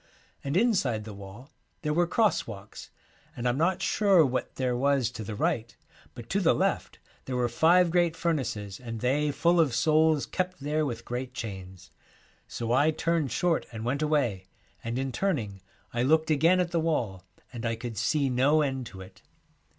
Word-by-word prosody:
And 140 +4 -1
inside 180 - +1
the 105 0 -8
wall 100 +7 -11 0.3
there 150 -1 0
were 175 +2 +2
cross 215 +3 +1
walks, 105 -2 -10 0.5
and 120 0 -1
I'm 125 +3 0
not 175 +3 +1
sure 195 -6 +4
what 130 -1 -3
there 125 -2 -1
was 135 -2 +1
to 115 -2 -7
the 110 0 -6
right, 115 +2 -1 0.4
but - - -9
to - - +2
the - - +3
left - - -1 0.3
there 130 - -4
were 125 -1 +1
five 170 +8 +4
great 170 -2 +2
fur 170 0 0
naces, 105 -8 -4
and 115 -2 -5
they 145 +4 +1
full 170 +4 +2
of 145 -7 +3
souls 155 +3 +3
kept 185 0 -3
there 150 +2 -1
with 115 -3 -6
great 125 +1 -5
chains. 95 -5 -8 0.6
So 115 -1 -4
I 145 +5 +4
turned 160 -3 0
short 170 +7 0
and 110 -1 -6
went 135 +4 -1
away, 130 -12 0 0.4
and 115 +1 -3
in 135 0 -2
turning 120 - -2 0.3
I 120 - 0
looked 155 +4 +3
again 165 +5 +4
at 175 -1 0
the 170 - +1
wall, 120 - -1 0.3
and 115 -2 -6
I 115 -1 -1
could 115 0 -6
see 140 +6 +1
no 135 +5 +3
end 135 -3 -3
to 100 -4 -11
it. 95 - -14
135 Hz, 190 wpm, -28 LUFS, 115-160 Hz, 0.6 s, sure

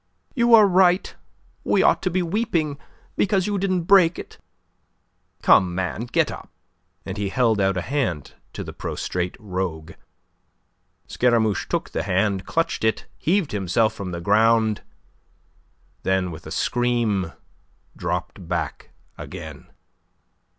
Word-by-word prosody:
"You 235 -2 +5
are 215 -2 +7
right. 185 -1 +3 0.5
We - - +2
ought - - +3
to 185 - 0
be 180 +1 0
weeping 170 -6 -1 0.4
because 195 -3 +1
you 205 -1 -1
didn't 185 -2 0
break 180 -2 +5
it. - - -10 1.0
Come, 90 -2 +5
man, 95 +5 -2
get - - +1
up," - - -9 0.6
and 95 +1 -5
he 100 -1 -1
held 110 -2 +2
out 95 -1 +1
a 90 - -2
hand 120 - -2 0.2
to - - -5
the - - -8
prostrate 90 0 -4
rogue. 90 -5 -4 1.1
Scaramouche 115 -4 +1
took - - -2
the - - -2
hand, 95 0 0
clutched 165 -7 -1
it, 110 0 0
heaved 180 -1 +1
himself 105 +3 +1
from 100 -4 -6
the 85 -1 -5
ground, 110 +2 +3 1.2
then 95 -1 0
with 80 - -10
a - - -8
scream 120 -7 0 0.6
dropped 90 0 -4
back 85 -1 -3 0.3
again. - - -9
110 Hz, 130 wpm, -23 LUFS, -, 1.2 s, are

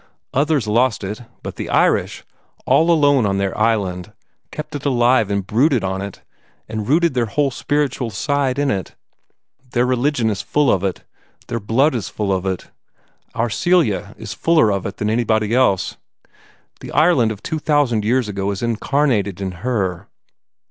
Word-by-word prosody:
Others 145 -2 +1
lost 115 0 +1
it, 105 +4 -5 0.2
but - - -7
the - - -5
Irish, - - +1 0.4
all 165 +2 +3
alone 145 -8 +4
on 100 0 0
their 100 -1 -1
island, 100 -5 0 0.4
kept 150 0 -7
it 145 -1 -5
alive 120 -5 +3
and 100 -2 -1
brooded 125 - +2
on 95 0 -2
it, 100 -1 -8 0.4
and 110 -1 -4
rooted 170 +1 +3
their 120 -2 0
whole 140 +6 0
spiritual 140 -2 -1
side 140 +1 -1
in 145 -1 +1
it. 95 -3 -4 0.8
Their 120 0 +2
religion 125 -2 +1
is 100 -1 -3
full 150 -1 +2
of 95 - +1
it; 95 -2 -2 0.5
their 115 - -2
blood 120 +8 +2
is 115 -8 -3
full 100 -2 -1
of 95 0 -2
it; 95 -1 -4 0.6
our 115 0 0
Celia 110 - +1
is 110 -1 -7
fuller 160 -10 +3
of 100 0 -2
it 95 - -8
than 105 - -2
anybody 110 -2 +1
else. 125 -7 +2 0.8
The - - -9
Ireland 150 -8 +4
of 105 -2 -8
two 160 - -3
thousand 145 -8 +1
years 120 +2 +1
ago 100 -1 -2
is 100 +2 -3
incarnated 115 -4 0
in 95 -1 -3
her. 95 -8 -2
115 Hz, 170 wpm, -19 LUFS, 100-140 Hz, 0.8 s, alone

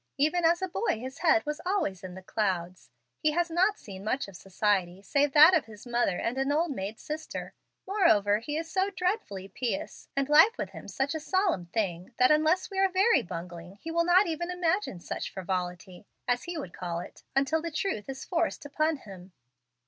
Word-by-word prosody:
Even 310 +5 +2
as 345 +3 +3
a - - +1
boy 375 - -1
his 260 +3 -7
head 330 -1 +3
was 300 0 -3
always 355 - -1
in 180 -1 -7
the 190 - -10
clouds. 185 -4 -2 0.3
He 305 -1 +2
has 345 +1 0
not 375 +5 +3
seen 195 -3 -10
much 255 +6 -1
society 190 0 -1
save 280 +7 +2
that 310 +4 +9
of 320 -8 +3
his 215 0 -13
mother 240 -6 +1
and 240 +3 -2
an 270 +1 +1
old 320 +2 +1
maid 210 -3 -5
sister. 310 +1 -6 0.3
Moreover, 215 - +3
he 295 +6 -4
is 325 0 -3
so 380 +3 0
dreadfully 360 - -2
pious, 260 +9 -4
and 275 -1 +1
life 320 +11 +6
with - - -4
him - - -10
such 270 +1 -1
a 315 - -2
solemn 360 - 0
thing, 185 +1 -3
that 255 +2 +5
unless 315 +6 +3
we 385 - -2
are 390 0 +4
very 385 +5 +4
bungling 175 0 -8
he 325 +10 -7
will 335 +1 +2
not 355 +3 +5
even 340 +1 -3
imagine 360 - 0
such - - -5
frivolity, 180 0 -4 0.2
as 245 0 0
he 345 -1 -4
would 230 - -6
call 170 -2 -4
it, 175 - -10
until 275 +4 +2
the 335 - -3
truth 305 - -3
is 270 0 -6
forced 335 -3 -1
upon 310 +2 0
him. 190 -6 -12
280 Hz, 200 wpm, -29 LUFS, -, 0.3 s, that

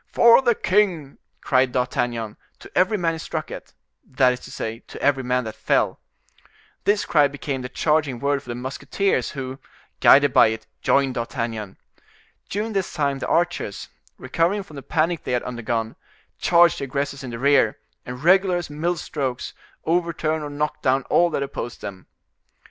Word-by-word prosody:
"For 235 +2 +7
the 240 -3 +3
king!" 180 -10 0 0.2
cried 130 -2 +2
D'Artagnan, 120 -3 -1 0.2
to - - -15
every 190 +4 +3
man 170 -3 0
he - - -5
struck 160 -1 -5
at, - - -9 0.3
that 130 -1 +2
is 125 - -7
to - - -12
say, 115 +1 -5
to - - -10
every 140 -2 +2
man 125 0 0
that 110 -1 -6
fell. - - 0 0.9
This 205 0 +2
cry 150 -3 +4
became 140 -1 -4
the 125 - -6
charging 150 -3 +1
word 140 +1 0
for 125 - -16
the 120 - -3
musketeers, 130 +5 -1
who, 130 0 -6 0.4
guided 145 -1 +6
by - - +7
it, 110 0 -4 0.2
joined 135 -2 +2
D'Artagnan. 115 -4 -4 0.7
During 215 +3 -2
this 195 -2 -1
time 140 -4 -1
the - - -4
archers, 175 - -1 0.3
recovering 185 +5 0
from 155 -7 -13
the - - -6
panic 165 +3 0
they - - -3
had 125 - 0
undergone, 115 -2 -3 0.4
charge 170 0 +4
the 140 - -3
aggressors 140 +1 -3
in 130 - -6
the 120 - -5
rear, 140 +3 +3 0.3
and 125 +2 -8
regular 185 +1 +4
as 175 -4 -5
mill 170 +4 -1
strokes, 135 -5 -4 0.3
overturn 165 -2 0
or 150 - -5
knock 150 +1 -3
down 130 0 +2
all 175 0 +4
that 140 - -1
opposed 120 -3 -6
them. 95 -2 -8
140 Hz, 175 wpm, -23 LUFS, 125-170 Hz, 0.9 s, For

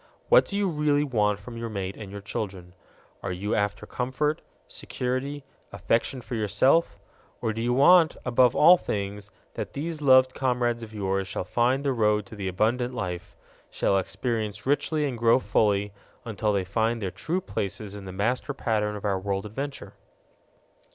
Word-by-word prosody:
What - - +7
do 200 - -4
you 205 -1 +1
really 150 -3 +1
want 105 -7 +1
from 115 +3 -9
your 115 0 -4
mate 100 -2 -4
and 100 -3 -9
your 100 0 -7
children? 95 -3 -5 0.5
Are 95 - -3
you 95 +4 -3
after 105 +1 -1
comfort, 130 +5 -2 0.3
security, 130 +3 -4 0.3
affection 120 +3 -1
for 125 - -9
yourself? 110 +9 +2 0.4
Or 110 - -1
do 115 - -4
you 120 +1 0
want, 160 +5 +6
above 125 0 +4
all 175 +4 +8
things, 100 - -4 0.2
that - - -5
these 155 +2 -4
loved 130 -2 +5
comrades 125 -2 0
of 110 -1 -8
yours 95 -2 -2
shall - - -3
find 120 +8 +1
the 140 -2 +1
road 105 -3 +2
to 110 - -11
the 100 -2 -4
abundant 120 +7 0
life 90 -5 -5 0.3
shall 100 - +1
experience 105 0 -3
richly 145 +2 +1
and 125 -5 -3
grow 115 +1 +5
fully, 105 -3 +1 0.3
until 110 -1 -1
they 100 -2 +1
find 110 +5 0
their 95 -4 -3
true 175 - -2
places 100 - -4
in 100 -1 -8
the 95 - -6
master 120 +9 -1
pattern 105 -4 -1
of 105 - -7
our 100 -2 +1
world 100 +1 -2
adventure? 135 +7 -6
115 Hz, 170 wpm, -26 LUFS, 100-130 Hz, 0.5 s, all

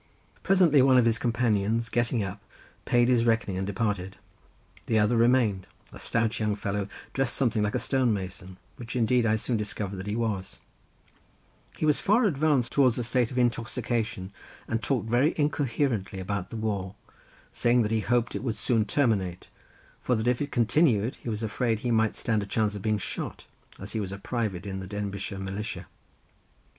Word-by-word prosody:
Presently 180 -7 +5
one 130 0 +5
of 125 - +5
his 115 -1 +2
companions, 115 -2 +1
getting 120 -1 0
up, 100 +1 -6 0.4
paid 120 0 +3
his 120 -2 +3
reckoning 115 -4 +1
and 95 +1 -2
departed, 100 -2 -2 0.7
the 110 - +2
other 105 +3 +3
remained, 115 -5 +3 0.3
a - - -10
stout 115 -1 0
young 105 -2 0
fellow 100 -1 -2 0.3
dressed 135 -3 +1
something 120 -5 +1
like 105 +4 0
a - - +3
stone 130 -1 +1
mason, 95 -2 -5 0.2
which 120 0 -7
indeed 120 0 +2
I 110 - +3
soon 115 +2 -1
discovered 105 -2 -4
that 95 +2 -6
he 105 - -2
was—he 110 +6 -7
was 150 -2 +3
far 220 +5 +3
advanced 145 - +2
towards 130 -4 +3
a 125 - -1
state 120 0 +1
of 130 - -7
intoxication 115 -5 -1 0.3
and 115 0 -1
talked 120 -2 -1
very 125 +7 +2
incoherently 135 -9 0
about 95 0 -3
the 115 - -6
war, 100 -3 -3 0.6
saying 120 0 +2
that 105 - -2
he 110 - +2
hoped 120 +2 0
it - - -3
would 115 -5 -2
soon 110 0 +1
terminate 100 -8 0 0.5
for 125 - +1
that 110 0 -2
if 125 +1 +1
it 145 0 -3
continued 120 -2 +2
he - - -7
was 110 0 -3
afraid 110 0 -1
he 120 - -1
might 110 -1 +2
stand 110 -3 0
a 100 - -5
chance 105 0 0
of 105 - -6
being 110 +1 +1
shot, 100 - -5 0.3
as 100 - -7
he 110 - -2
was 100 -3 -3
a 100 - -5
private 105 -3 -3
in 95 -1 -4
the 95 - -7
Denbighshire 100 -1 -4
Militia. 95 +2 -5
115 Hz, 180 wpm, -27 LUFS, 100-125 Hz, 0.7 s, Presently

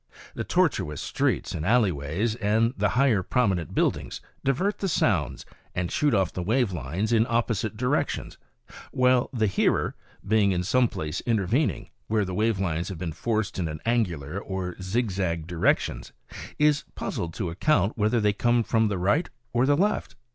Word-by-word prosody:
The - - -4
tortuous 75 -1 0
streets - - -1
and 75 - -3
alley 110 +1 +3
ways, 80 +10 -2
and 115 +1 +1
the 105 +1 +1
higher 130 -7 +4
prominent 95 - 0
build - - +2
ings, - - -7 0.2
divert 185 +10 0
the 195 - -1
sounds 90 - 0 0.3
and 90 -1 -2
shoot 145 -5 +2
off 95 -2 +1
the 90 - -3
wave 115 +4 +1
lines 90 - -2
in 115 +1 +3
opposite 115 -2 0
directions, 125 +5 -1 0.5
while 125 -1 +3
the 115 -5 +1
hearer, 100 -2 +1 0.3
being 100 -2 +3
in 90 0 -1
some 125 +6 +3
place 80 -4 -4
intervening, 115 - 0 0.2
where 110 -2 +1
the 95 - -5
wave 110 +2 +1
lines 85 -3 -2
have 95 - -6
been 80 -1 -4
forced 110 +2 -2
in 80 -4 -3
angular 90 - 0
or 95 -3 -4
zigzag 95 -5 -1
di 90 - -8
rections, 80 - 0 0.4
is 150 -1 +3
puzzled 85 -1 -4
to 90 -6 -3
account 100 - +1
whether 110 +2 +2
they 105 -1 +2
come 120 +3 +2
from 110 0 +2
the 100 -2 -1
right 100 - +1 0.2
or 120 +2 +3
the 145 0 +4
left. 205 +5 0
105 Hz, 170 wpm, -26 LUFS, 90-120 Hz, 0.5 s, higher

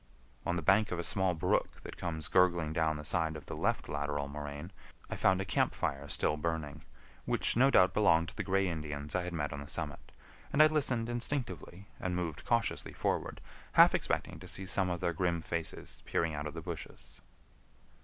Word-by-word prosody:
On 85 - +1
the 85 - -2
bank 100 +5 +4
of 90 - -1
a 85 - -2
small 95 0 +1
brook 80 - 0
that - - -8
comes 80 -3 -3
gurgling 85 -4 +3
down 80 -1 +1
the 75 - -8
side 80 -1 0
of 75 -3 -8
the - - -6
left - - 0
lateral 75 -1 -2
moraine, 75 +4 -6 0.4
I - - -1
found 95 0 +3
a 95 - -2
camp 85 - +1
fire 70 +1 -2
still 75 - +1
burning, 75 -2 -3 0.4
which - - 0
no 130 +4 +6
doubt 95 -8 +5
belonged 85 -6 +4
to - - -15
the - - -2
gray 95 0 +2
Indians 75 -3 -4
I 90 - +1
had 90 - -4
met 75 -3 -2
on 75 - -5
the 70 - -8
summit, 75 -1 -5 0.4
and 155 - +7
I - - +8
listened 130 -7 +1
instinctively 120 -6 -3
and 90 -1 -2
moved 85 -4 -3
cautiously 115 -1 0
forward, - - -2 0.3
half - - +8
expecting - - -1
to - - -10
see 95 - -3
some 95 0 +1
of 90 0 -2
their 85 -2 +1
grim 85 -1 0
faces 85 -1 -4
peering 80 -1 0
out 75 0 -3
of 75 - -7
the - - -5
bushes. - - -8
85 Hz, 205 wpm, -32 LUFS, 75-95 Hz, 0.4 s, I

